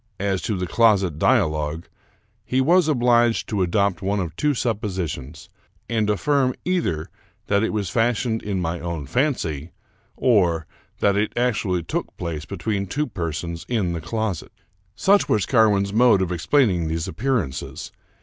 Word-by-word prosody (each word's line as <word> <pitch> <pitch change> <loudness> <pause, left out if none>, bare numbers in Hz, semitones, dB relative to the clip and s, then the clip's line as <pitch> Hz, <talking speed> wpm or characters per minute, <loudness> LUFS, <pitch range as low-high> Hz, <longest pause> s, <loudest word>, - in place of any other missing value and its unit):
As 95 -1 0
to 110 -4 -2
the 90 - -2
closet 95 -6 +2
dia 120 -2 +4
logue, 75 +1 -3 0.6
he 130 - 0
was 170 +5 +4
obliged 120 -4 +3
to 105 -3 -1
adopt 100 +2 +1
one 100 +2 0
of 85 -4 -4
two 150 +5 +1
suppositions, 95 - -3 0.4
and 110 -2 0
affirm 130 +4 +1
either 85 - -1 0.3
that 100 0 +2
it 110 - 0
was 105 -3 -2
fashioned 115 -1 +1
in 100 -2 -2
my 85 0 -2
own 85 -4 -4
fancy, 85 - -1 0.5
or 90 -10 +2 0.4
that 100 -1 +3
it 105 +3 -1
actually 105 -8 0
took - - -4
place 80 -3 -4
between 100 +3 -3
two 145 +10 -1
persons 85 - -4
in 105 -8 0
the 85 - -4
closet. 105 +1 -3 0.4
Such 200 - +3
was 105 -4 +2
Carwin's 105 -5 +3
mode 115 -4 +5
of 90 - -3
explaining 90 - +2
these 80 0 -2
appearances. 95 - -3
100 Hz, 150 wpm, -23 LUFS, 85-120 Hz, 0.6 s, mode